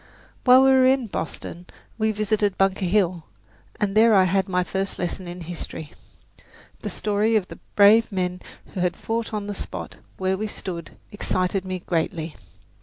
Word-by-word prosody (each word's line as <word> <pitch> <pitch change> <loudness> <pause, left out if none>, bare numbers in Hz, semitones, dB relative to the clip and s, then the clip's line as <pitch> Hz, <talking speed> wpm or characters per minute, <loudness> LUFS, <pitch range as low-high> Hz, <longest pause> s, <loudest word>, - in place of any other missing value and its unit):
While 255 +1 +8
we 270 - +6
were 260 -1 +6
in 260 -1 +3
Boston 175 -2 -6 0.3
we 220 0 +2
visited 210 -1 0
Bunker 195 0 +2
Hill, 180 -3 +1 0.5
and 205 -1 0
there 220 0 +6
I 190 - +6
had 190 +1 +1
my 180 0 +1
first 195 +2 -3
lesson 180 +1 -4
in 175 +1 -7
history. 160 -2 -6 0.9
The - - -4
story 210 +2 0
of 200 -4 +1
the - - -10 0.2
brave 215 +3 +6
men 180 -1 -2 0.3
who - - -4
had 180 -1 0
fought 225 0 -3
on 210 -2 -3
the 205 - -4
spot - - -6 0.2
where 190 0 0
we 215 - -1
stood 175 -5 -7
excited 190 -2 -1
me 185 -1 -4
greatly. 165 -1 -2
195 Hz, 170 wpm, -24 LUFS, 180-215 Hz, 0.9 s, While